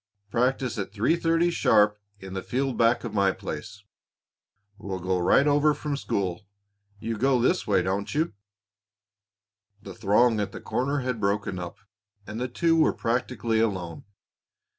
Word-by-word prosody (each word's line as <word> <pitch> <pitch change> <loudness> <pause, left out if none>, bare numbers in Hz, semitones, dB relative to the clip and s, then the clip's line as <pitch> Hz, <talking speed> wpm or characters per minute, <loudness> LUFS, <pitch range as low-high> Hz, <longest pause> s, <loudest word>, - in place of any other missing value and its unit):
Practice 125 -2 0
at 100 - -4
three 110 +10 +2
thirty 170 +1 +2
sharp 105 -9 +3 0.2
in 95 -1 -9
the 95 - -3
field 130 +3 -2
back 115 +1 +3
of 115 -3 -5
my 100 -2 +3
place. 100 +1 -7 1.0
We'll 95 -1 -4
go 90 0 -1
right 90 +10 +4
over 145 +1 +3
from 150 0 -3
school. 95 -9 -2 0.6
You 110 0 -4
go 130 +1 +3
this - - +1
way, - - +3
don't 95 +2 -2
you?" 160 -1 0 1.5
The - - -8
throng 110 +2 +3
at 100 - -3
the - - -6
corner 140 +3 -1
had 125 -2 -2
broken 100 -2 -1
up, 85 0 -7 0.5
and 105 +3 -6
the 125 - -1
two 165 +6 +1
were 160 - +4
practically 115 -1 -1
alone. 95 -7 -2
115 Hz, 155 wpm, -26 LUFS, 100-135 Hz, 1.5 s, right